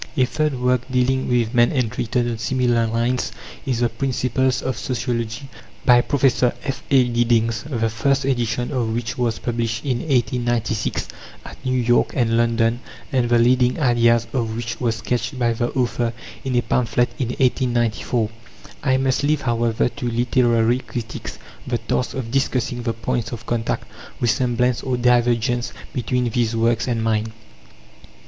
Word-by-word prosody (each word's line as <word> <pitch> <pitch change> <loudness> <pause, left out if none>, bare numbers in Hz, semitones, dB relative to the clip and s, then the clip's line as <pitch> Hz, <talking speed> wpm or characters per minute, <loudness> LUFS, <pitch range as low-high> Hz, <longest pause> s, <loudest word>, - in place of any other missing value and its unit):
A 130 - +5
third 150 0 -1
work 125 -1 +2
dealing 130 +1 +1
with 120 -2 +1
man 120 -1 +4
and 125 -4 -1
written 125 -1 0
on 115 -2 -3
similar 120 -1 +1
lines 120 +3 0 0.4
is 125 -3 0
The 120 - +3
Principles 130 +1 0
of 130 - -1
Sociology, 120 +1 -3 0.4
by 120 -1 +7
Prof. 135 0 +1
F.A. 130 0 +1
Giddings, 115 -2 +1
the 115 -5 0
first 135 +5 0
edition 120 -1 -1
of 115 -4 -1
which 120 +2 -3
was 120 -2 0
published 115 +1 -2
in 125 -4 0
1896 120 -5 0 0.4
at - - -11
New 130 -1 0
York 120 0 +2
and 115 -3 +2
London, 115 0 +2 0.3
and 125 -3 +1
the 120 - +4
leading 125 +2 +3
ideas 120 -3 +3
of 115 -4 -1
which 115 0 -4
were 120 -2 +2
sketched 115 +2 -2
by 120 -2 +1
the 120 +1 -1
author 120 -2 0 0.3
in 130 -2 -2
a 120 - +2
pamphlet 120 +1 +1
in 130 - 0
1894. 120 -3 0 0.5
I 130 -1 +2
must 130 -1 +1
leave, 145 +1 +1
however, 115 -2 +1
to 120 +1 -4
literary 120 0 +2
critics 115 -3 -6 0.3
the - - 0
task 65 -1 -2
of 120 -4 -4
discussing 125 -2 0
the 115 -1 -1
points 115 -1 -2
of 120 -1 -7
contact, 115 -1 -2 0.3
resemblance, 125 0 +1
or 130 -2 -1
divergence 120 0 +2 0.2
between 125 0 0
these 115 -1 0
works 115 +1 +1
and 115 -2 0
mine. 110 0 0
120 Hz, 155 wpm, -21 LUFS, 115-125 Hz, 0.5 s, by